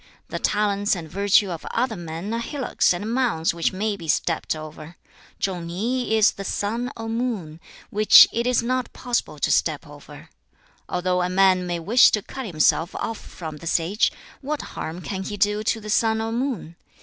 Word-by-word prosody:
The -, -, -4 dB
talents 205 Hz, -1 st, +1 dB
and 165 Hz, -3 st, -7 dB
virtue 200 Hz, +2 st, +2 dB
of 165 Hz, -, -6 dB
other 240 Hz, -1 st, -1 dB
men 170 Hz, +4 st, -5 dB
are 230 Hz, -, -1 dB
hillocks 265 Hz, +2 st, 0 dB
and 205 Hz, +6 st, -2 dB
mounds 235 Hz, -12 st, +1 dB
which 170 Hz, -1 st, 0 dB
may 205 Hz, +2 st, -2 dB
be 170 Hz, -4 st, -10 dB
stepped 160 Hz, +1 st, 0 dB
over. 155 Hz, +1 st, -10 dB, 0.4 s
Chung 180 Hz, -3 st, -3 dB
ni 220 Hz, +7 st, -1 dB
is 215 Hz, -1 st, +5 dB
the 195 Hz, -, -8 dB
sun 230 Hz, +6 st, -2 dB
or 225 Hz, 0 st, -5 dB
moon, 225 Hz, -9 st, -3 dB, 0.3 s
which 215 Hz, +1 st, +8 dB
it 235 Hz, +1 st, -1 dB
is 250 Hz, -2 st, +2 dB
not 255 Hz, 0 st, -1 dB
possible 245 Hz, -1 st, -2 dB
to -, -, 0 dB
step -, -, +1 dB
over. -, -, -13 dB, 0.6 s
Although 180 Hz, 0 st, 0 dB
a 180 Hz, -, 0 dB
man 185 Hz, -1 st, +3 dB
may 175 Hz, -1 st, -1 dB
wish 220 Hz, +9 st, +6 dB
to 210 Hz, -, +1 dB
cut 265 Hz, -3 st, -7 dB
himself 160 Hz, 0 st, +1 dB
off 225 Hz, -, -4 dB
from 160 Hz, -3 st, -8 dB
the 165 Hz, -, -9 dB
sage, 175 Hz, +6 st, +1 dB, 0.3 s
what 295 Hz, +2 st, -3 dB
harm 165 Hz, +3 st, -5 dB
can 190 Hz, +1 st, -4 dB
he 205 Hz, +2 st, -5 dB
do 210 Hz, +1 st, +1 dB
to 225 Hz, -, +1 dB
the 215 Hz, -1 st, -6 dB
sun 220 Hz, 0 st, +2 dB
or 225 Hz, 0 st, -2 dB
moon? 230 Hz, -, -3 dB
205 Hz, 185 wpm, -23 LUFS, 175-230 Hz, 0.6 s, which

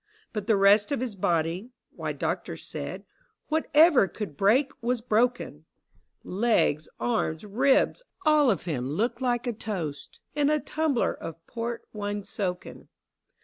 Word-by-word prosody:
But 210 Hz, -2 st, -4 dB
the 220 Hz, -3 st, +4 dB
rest 205 Hz, +4 st, +5 dB
of 280 Hz, -, 0 dB
his 245 Hz, -4 st, -3 dB
body 175 Hz, +4 st, 0 dB
— -, -, -56 dB
why. -, -, -3 dB
doctors -, -, -3 dB
said, -, -, -6 dB, 0.4 s
Whatever 310 Hz, -, +5 dB
could 190 Hz, -5 st, -6 dB
break 235 Hz, -, +3 dB
was 240 Hz, +1 st, 0 dB
broken: 240 Hz, +2 st, +1 dB
88 -, -, -10 dB
THE 75 Hz, -, -20 dB
BOYS' 80 Hz, -, -39 dB
BROWNING. 190 Hz, +3 st, -4 dB
Legs, 185 Hz, -10 st, +2 dB
arms, 215 Hz, -9 st, -1 dB
ribs, 260 Hz, -, +2 dB, 0.2 s
all 305 Hz, -3 st, +5 dB
of 195 Hz, -8 st, 0 dB
him 135 Hz, -7 st, -3 dB
looked 235 Hz, -, -1 dB
like 245 Hz, -1 st, 0 dB
a 240 Hz, -, -1 dB
toast 175 Hz, -10 st, -5 dB
In 290 Hz, -1 st, +2 dB
a 305 Hz, 0 st, +2 dB
tumbler 300 Hz, -5 st, 0 dB
of 165 Hz, 0 st, -9 dB
port 235 Hz, 0 st, -5 dB
wine 205 Hz, -1 st, -3 dB
soaken. 190 Hz, -3 st, -5 dB
220 Hz, 160 wpm, -27 LUFS, 185-250 Hz, 0.4 s, rest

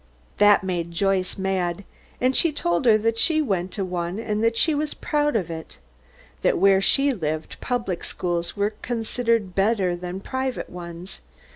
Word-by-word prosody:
That 205 Hz, -1 st, +6 dB
made 175 Hz, -3 st, -2 dB
Joyce 190 Hz, +1 st, 0 dB
mad, 190 Hz, -1 st, -1 dB, 0.4 s
and 255 Hz, +1 st, +2 dB
she 335 Hz, -, +3 dB
told 175 Hz, -9 st, 0 dB
her 220 Hz, -3 st, +6 dB
that 225 Hz, +1 st, 0 dB
she 315 Hz, +4 st, +3 dB
went 190 Hz, -, -1 dB
to 195 Hz, -, -1 dB
one 175 Hz, 0 st, -3 dB
and 215 Hz, -1 st, -2 dB
that 230 Hz, 0 st, +2 dB
she 320 Hz, -, +3 dB
was 300 Hz, +1 st, -2 dB
proud 295 Hz, -4 st, 0 dB
of 180 Hz, -6 st, -1 dB
it; 160 Hz, -1 st, -8 dB, 0.6 s
that -, -, +2 dB
where 195 Hz, +1 st, +5 dB
she 275 Hz, +6 st, +3 dB
lived 155 Hz, -6 st, -4 dB
public 235 Hz, -8 st, -2 dB
schools 175 Hz, +1 st, -2 dB
were 205 Hz, +1 st, 0 dB
considered 230 Hz, -3 st, 0 dB
better 195 Hz, -2 st, +2 dB
than 180 Hz, +1 st, -5 dB
the 195 Hz, -, -10 dB
private 260 Hz, -1 st, -3 dB
ones. 175 Hz, +1 st, -8 dB
195 Hz, 170 wpm, -24 LUFS, 180-230 Hz, 0.6 s, That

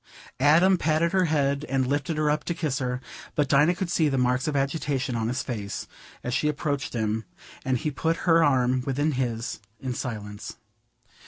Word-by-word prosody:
Adam 170 Hz, +7 st, +5 dB
patted 160 Hz, +2 st, +2 dB
her 185 Hz, -1 st, +3 dB
head 140 Hz, -2 st, +1 dB
and 135 Hz, -1 st, +1 dB
lifted 145 Hz, +4 st, -1 dB
her 155 Hz, 0 st, +1 dB
up 150 Hz, 0 st, 0 dB
to 170 Hz, -, -2 dB
kiss 150 Hz, -6 st, -1 dB
her, 125 Hz, -1 st, -2 dB, 0.4 s
but 145 Hz, -2 st, +2 dB
Dinah 150 Hz, +6 st, +4 dB
could 180 Hz, -1 st, -3 dB
see 160 Hz, -3 st, +3 dB
the 135 Hz, -, 0 dB
marks 125 Hz, +3 st, +1 dB
of 150 Hz, -, -1 dB
agitation 140 Hz, -2 st, -1 dB
on 110 Hz, -1 st, -1 dB
his 125 Hz, +4 st, -1 dB
face 105 Hz, -6 st, -4 dB, 0.4 s
as 125 Hz, -, -2 dB
she 150 Hz, -, +1 dB
approached 145 Hz, -2 st, -2 dB
him, 110 Hz, -1 st, -1 dB, 0.4 s
and 130 Hz, -1 st, +1 dB
he 155 Hz, +3 st, -2 dB
put 165 Hz, +4 st, 0 dB
her 165 Hz, -2 st, +5 dB
arm 130 Hz, -3 st, +3 dB
within 145 Hz, +4 st, 0 dB
his 120 Hz, -4 st, -2 dB, 0.2 s
in 130 Hz, -2 st, -3 dB
silence. 105 Hz, -5 st, -6 dB
140 Hz, 185 wpm, -26 LUFS, 125-155 Hz, 0.4 s, Adam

